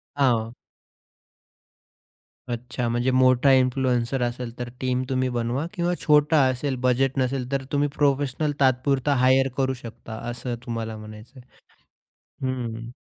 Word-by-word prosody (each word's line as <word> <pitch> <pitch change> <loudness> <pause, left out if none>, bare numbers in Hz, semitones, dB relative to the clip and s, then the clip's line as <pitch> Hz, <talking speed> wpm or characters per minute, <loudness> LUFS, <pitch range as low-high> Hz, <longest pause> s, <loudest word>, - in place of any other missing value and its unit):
हां. 120 -4 +1 2.0
अच्छा. 120 0 -3
म्हणजे 120 +2 +1
मोठा 130 +1 +4
इन्फ्लुएन्सर 130 -1 +2
असेल 120 0 -2
तर 120 0 -4
टीम 130 0 0
तुम्ही 130 -1 0
बनवा 120 +6 -1
किंवा 175 +1 0
छोटा 150 0 +4
असेल, 130 +1 -1
बजेट 130 +2 +1
नसेल, 130 0 -1
तर 135 -1 0
तुम्ही 145 0 +2
प्रोफेशनल 145 +1 +1
तात्पुरता 135 +1 +2
हायर 130 +1 +4
करू 130 -1 +1
शकता, 115 -2 -10 0.2
असं 120 0 -4
तुम्हाला 115 -2 -4
म्हणायचं 110 +4 -12
आहे. 125 - -17 1.1
हं. 115 -2 -5
130 Hz, 125 wpm, -24 LUFS, 120-135 Hz, 2.0 s, मोठा